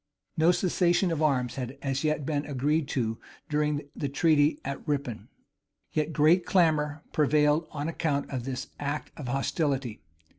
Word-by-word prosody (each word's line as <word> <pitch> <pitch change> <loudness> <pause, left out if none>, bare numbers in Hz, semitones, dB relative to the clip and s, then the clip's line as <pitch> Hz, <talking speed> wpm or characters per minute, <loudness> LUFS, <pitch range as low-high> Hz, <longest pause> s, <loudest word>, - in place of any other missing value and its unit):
No 160 +2 +5
cessation 175 0 +2
of 160 -2 -1
arms 130 -5 +1
had 130 +1 -5
as 135 0 -1
yet 155 -2 0
been 145 -1 -1
agreed 145 +2 0
to 115 -5 -1 0.3
during 150 0 0
the 140 - -2
treaty 150 +1 +3
at 140 0 -4
Rippon; 140 -6 -2 0.6
yet 155 +1 0
great 160 +4 +4
clamor 155 -4 +2
prevailed 150 +1 +3
on 145 +1 -4
account 150 -4 -1
of 130 -3 -3
this 130 0 -4
act 145 +1 -3
of 145 -5 -7
hostility. 135 - -1
150 Hz, 150 wpm, -28 LUFS, 135-155 Hz, 0.6 s, No